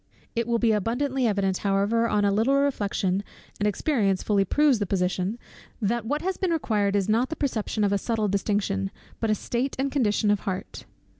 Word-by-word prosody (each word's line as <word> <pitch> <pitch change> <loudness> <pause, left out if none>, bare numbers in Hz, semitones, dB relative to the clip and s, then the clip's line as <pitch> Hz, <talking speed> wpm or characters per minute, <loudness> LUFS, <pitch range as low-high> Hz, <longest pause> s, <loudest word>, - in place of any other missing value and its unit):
It 235 0 0
will 235 -1 +2
be 230 -1 +3
abundantly 245 +5 0
evident 195 -3 0
however 205 +4 +1
on 205 -1 +2
a 200 - +3
little 225 +7 +2
reflection, 205 -8 0 0.4
and 210 - +1
experience 205 -4 +1
fully 200 -2 +2
proves 285 +4 +3
the 205 - -1
position, 185 +3 -1 0.4
that 225 +1 -1
what 295 +5 -1
has 375 0 -1
been 375 - 0
required 210 -11 +1
is 200 -2 +1
not 230 +4 +2
the 320 - -3
perception 225 -7 -1
of 200 -1 +2
a 200 - +1
subtile 220 0 -1
distinction, 195 - 0 0.3
but 225 - -1
a 215 - +3
state 245 +6 -2
and 270 +1 -1
condition 215 -6 +2
of 205 - +2
heart. 190 -2 -5
215 Hz, 195 wpm, -26 LUFS, 200-245 Hz, 0.4 s, be